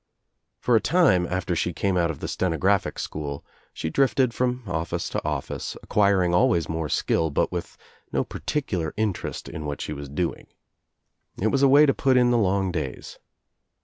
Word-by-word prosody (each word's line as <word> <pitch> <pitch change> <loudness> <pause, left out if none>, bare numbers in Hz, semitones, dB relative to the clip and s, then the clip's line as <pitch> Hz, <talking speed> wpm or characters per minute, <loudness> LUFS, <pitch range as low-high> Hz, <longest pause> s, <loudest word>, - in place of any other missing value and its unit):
For 120 - +2
a 110 - +4
time 155 - +3
after 90 -1 -2
she 85 +1 -1
came 95 +4 0
out 85 -2 +2
of 80 - -5
the - - -3
steno 90 -3 -1
graphic 100 +2 +1
school 70 -2 -5 0.3
she 80 - -4
drifted 130 - +2
from 125 0 -1
office 85 -3 -3
to - - -3
office, - - -4
acquir, 100 -3 +3
ing 85 - 0
always 110 -4 +3
more 80 -2 -3
skill, 80 - +1
but 70 - 0
with - - -5 0.3
no - - +1
particular 95 - -3
interest 105 -4 -2
in 80 - -6
what 75 -1 -4
she 75 - -4
was 70 -1 -7
doing. 85 +5 -3 0.9
It 110 +3 +1
was 135 - +1
a 140 - +6
way 145 +3 +7
to 135 - +3
put 130 -2 +2
in 125 -1 +4
the 120 - +3
long 95 -2 +1
days. 75 -7 -5
95 Hz, 185 wpm, -25 LUFS, 80-120 Hz, 0.9 s, way